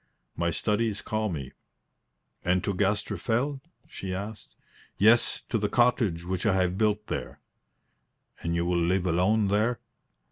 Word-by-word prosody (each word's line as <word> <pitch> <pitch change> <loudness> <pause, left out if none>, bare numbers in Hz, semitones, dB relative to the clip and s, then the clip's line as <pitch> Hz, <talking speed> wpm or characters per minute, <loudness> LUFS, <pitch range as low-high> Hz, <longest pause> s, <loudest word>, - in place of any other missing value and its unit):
"My 85 0 0
studies 105 +4 0
call 110 0 -2
me." 70 -7 -5 0.9
"And 90 +1 +1
to 100 - -1
Gaster 100 +1 0
Fell?" 130 +8 -1 0.3
she 95 -1 -5
asked. 105 +2 -7 0.4
"Yes; 115 +3 +4
to 115 - +1
the 105 0 0
cottage 115 -8 +2
which 90 0 -2
I 105 -4 +3
have 90 -1 +1
built 105 0 +1
there." - - -5 1.0
"And 85 0 -1
you 85 0 0
will 90 0 +1
live 90 +2 +1
alone 95 +5 +2
there?" 110 +4 +1
100 Hz, 145 wpm, -27 LUFS, 90-110 Hz, 1.0 s, Yes